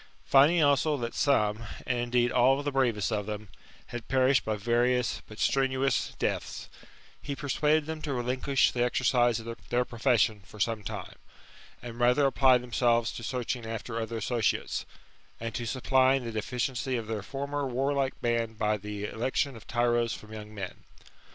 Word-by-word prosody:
Finding' 150 Hz, +5 st, +5 dB
also 145 Hz, +1 st, +3 dB
that 120 Hz, -2 st, -4 dB
some, 110 Hz, -6 st, +2 dB, 0.2 s
and 125 Hz, -1 st, 0 dB
indeed 120 Hz, 0 st, +1 dB
all 130 Hz, +3 st, +3 dB
the 145 Hz, -, -1 dB
bravest 120 Hz, -6 st, +1 dB
of 105 Hz, -2 st, -2 dB
them, 105 Hz, -1 st, -5 dB, 0.4 s
had 120 Hz, -2 st, -7 dB
perished 130 Hz, +1 st, +3 dB
by 110 Hz, -, -1 dB
various 120 Hz, +3 st, +1 dB
but 105 Hz, -, -12 dB
strenuous 135 Hz, 0 st, +1 dB
deaths, -, -, -3 dB, 0.5 s
he 140 Hz, -, -4 dB
persuaded 150 Hz, +3 st, +1 dB
them 160 Hz, 0 st, -5 dB
to 150 Hz, -, -3 dB
relinquish 130 Hz, +2 st, +1 dB
the 120 Hz, -, -2 dB
exercise 120 Hz, -1 st, +2 dB
of 115 Hz, +1 st, -6 dB
their 125 Hz, +1 st, +1 dB
profession 115 Hz, -3 st, +1 dB
for 105 Hz, -, -14 dB
some 110 Hz, +1 st, 0 dB
time, 100 Hz, -, -7 dB, 0.7 s
and 120 Hz, -1 st, -8 dB
rather 125 Hz, +4 st, +4 dB
apply 130 Hz, -1 st, +5 dB
themselves 120 Hz, -2 st, +1 dB
to -, -, -7 dB
searching 125 Hz, 0 st, -3 dB
after 115 Hz, +1 st, -4 dB
other 115 Hz, +1 st, -4 dB
associates, 115 Hz, 0 st, -1 dB, 0.5 s
and 115 Hz, 0 st, -4 dB
to 120 Hz, 0 st, -3 dB
supplying 130 Hz, +1 st, +2 dB
the 115 Hz, -, -4 dB
deficiency 125 Hz, +4 st, -2 dB
of 115 Hz, -, -4 dB
their 110 Hz, -1 st, -3 dB
former 140 Hz, +4 st, -3 dB
warlike 135 Hz, +1 st, -1 dB
band 115 Hz, -2 st, -1 dB
by 105 Hz, -1 st, +1 dB
the 105 Hz, 0 st, -6 dB
election 130 Hz, +5 st, -1 dB
of 115 Hz, -, -13 dB
tyros 120 Hz, 0 st, +1 dB
from 110 Hz, 0 st, -12 dB
young 105 Hz, -1 st, -8 dB
men. 100 Hz, -4 st, -7 dB
120 Hz, 165 wpm, -29 LUFS, 115-135 Hz, 0.7 s, Finding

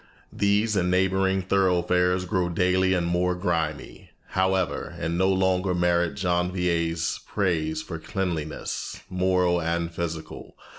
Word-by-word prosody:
These 105 Hz, +2 st, +2 dB
and 90 Hz, -2 st, +1 dB
neighboring 95 Hz, +1 st, +2 dB
thoroughfares 90 Hz, -1 st, +2 dB
grow 90 Hz, 0 st, 0 dB
daily 90 Hz, +1 st, +2 dB
more 90 Hz, +1 st, 0 dB
grimy, 80 Hz, -5 st, -3 dB, 0.2 s
however, 95 Hz, -1 st, 0 dB
and 85 Hz, -, -2 dB
no 95 Hz, +2 st, +2 dB
longer 95 Hz, -1 st, +1 dB
merit 85 Hz, -1 st, +1 dB
Janvier's 90 Hz, -3 st, 0 dB
praise 80 Hz, -5 st, -1 dB
for 80 Hz, -3 st, -6 dB
cleanliness, 85 Hz, -4 st, -4 dB
moral 90 Hz, -1 st, +2 dB
and 85 Hz, 0 st, -2 dB
physical. 80 Hz, -2 st, -6 dB
90 Hz, 110 wpm, -25 LUFS, 85-95 Hz, 0.2 s, These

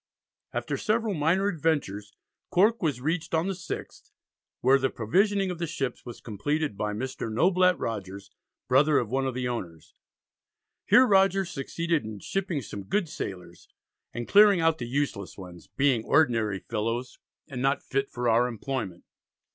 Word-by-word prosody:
After -, -, -3 dB
several 220 Hz, -1 st, 0 dB
minor 170 Hz, +5 st, +2 dB
adventures 145 Hz, -, -1 dB, 0.4 s
Cork 215 Hz, +6 st, +3 dB
was 145 Hz, -8 st, -1 dB
reached 160 Hz, +3 st, -1 dB
on 160 Hz, +2 st, +1 dB
the 195 Hz, -, -1 dB
6th, 175 Hz, -2 st, -7 dB, 0.5 s
where 135 Hz, +2 st, +5 dB
the 135 Hz, 0 st, +1 dB
provisioning 195 Hz, -, +1 dB
of 175 Hz, -, -6 dB
the 170 Hz, -, -2 dB
ships 135 Hz, -5 st, -4 dB
was 120 Hz, -, -8 dB
completed 145 Hz, +5 st, -2 dB
by 105 Hz, +1 st, -2 dB
Mr. 115 Hz, +1 st, -4 dB
Noblett 180 Hz, -, +3 dB
Rogers, 100 Hz, -2 st, -5 dB, 0.4 s
brother 140 Hz, +4 st, +4 dB
of 115 Hz, -2 st, -1 dB
one 135 Hz, +1 st, 0 dB
of 130 Hz, -, -3 dB
the 125 Hz, -1 st, -2 dB
owners. 90 Hz, -10 st, -6 dB, 0.9 s
Here 255 Hz, -, +7 dB
Rogers 195 Hz, -3 st, +3 dB
succeeded 165 Hz, +3 st, -1 dB
in 110 Hz, -1 st, -7 dB
shipping 175 Hz, -, -3 dB
some 100 Hz, -2 st, -7 dB
good 195 Hz, -, 0 dB
sailors, 90 Hz, -, -7 dB, 0.4 s
and 120 Hz, 0 st, -5 dB
clearing 205 Hz, -2 st, +6 dB
out 165 Hz, -1 st, +2 dB
the 120 Hz, -, -4 dB
useless 125 Hz, -7 st, -2 dB
ones, 90 Hz, -3 st, -11 dB
"being 135 Hz, -5 st, +1 dB
ordinary 115 Hz, -10 st, +2 dB
fellows, 115 Hz, +5 st, -3 dB, 0.3 s
and 130 Hz, -5 st, -6 dB
not 135 Hz, +2 st, +1 dB
fit 135 Hz, 0 st, -1 dB
for 120 Hz, 0 st, -3 dB
our 120 Hz, +2 st, +4 dB
employment." 115 Hz, -6 st, -4 dB
135 Hz, 155 wpm, -27 LUFS, 115-170 Hz, 0.9 s, Here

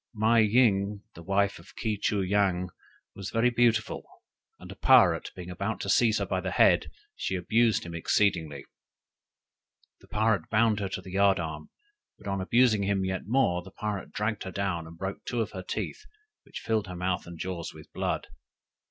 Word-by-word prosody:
"Mei 110 Hz, +2 st, +4 dB
ying, 105 Hz, -3 st, +2 dB
the 85 Hz, -, -11 dB
wife 100 Hz, +2 st, 0 dB
of 85 Hz, -, -17 dB
Ke 105 Hz, -2 st, -2 dB
choo 100 Hz, -2 st, +1 dB
yang, 95 Hz, -2 st, +1 dB, 0.4 s
was 100 Hz, -1 st, -6 dB
very 120 Hz, +2 st, +2 dB
beautiful, 115 Hz, -2 st, +1 dB, 0.5 s
and -, -, -11 dB
a -, -, -9 dB
pirate -, -, +5 dB
being 90 Hz, -1 st, -8 dB
about 100 Hz, +4 st, -3 dB
to 100 Hz, -, -4 dB
seize 115 Hz, -3 st, +4 dB
her -, -, -1 dB
by -, -, -2 dB
the -, -, -3 dB
head, -, -, +4 dB, 0.3 s
she 95 Hz, -, -2 dB
abused 110 Hz, +5 st, +2 dB
him 85 Hz, -, -7 dB
exceedingly. 85 Hz, -5 st, 0 dB, 1.3 s
The -, -, -20 dB
pirate 110 Hz, -1 st, 0 dB
bound 110 Hz, -1 st, +3 dB
her 100 Hz, -2 st, -2 dB
to -, -, -5 dB
the 95 Hz, -, -10 dB
yard 100 Hz, 0 st, +3 dB
arm; 80 Hz, -2 st, -5 dB, 0.5 s
but -, -, -12 dB
on 100 Hz, -1 st, -1 dB
abusing 115 Hz, +1 st, +3 dB
him 100 Hz, -1 st, 0 dB
yet 95 Hz, 0 st, -3 dB
more, 110 Hz, -8 st, +2 dB
the 90 Hz, -, -12 dB
pirate 105 Hz, 0 st, -5 dB
dragged 105 Hz, +1 st, -2 dB
her 95 Hz, -, -5 dB
down 95 Hz, -4 st, -2 dB
and 85 Hz, +1 st, -12 dB
broke 95 Hz, +2 st, -5 dB
two 120 Hz, -, -3 dB
of 110 Hz, -1 st, -1 dB
her 95 Hz, -, -6 dB
teeth, 90 Hz, -, -5 dB, 0.4 s
which -, -, -8 dB
filled 110 Hz, -3 st, -1 dB
her 90 Hz, -, -7 dB
mouth 90 Hz, 0 st, -2 dB
and 85 Hz, -1 st, -9 dB
jaws 90 Hz, -1 st, -4 dB
with -, -, -15 dB
blood. -, -, -2 dB
100 Hz, 185 wpm, -28 LUFS, 90-110 Hz, 1.3 s, pirate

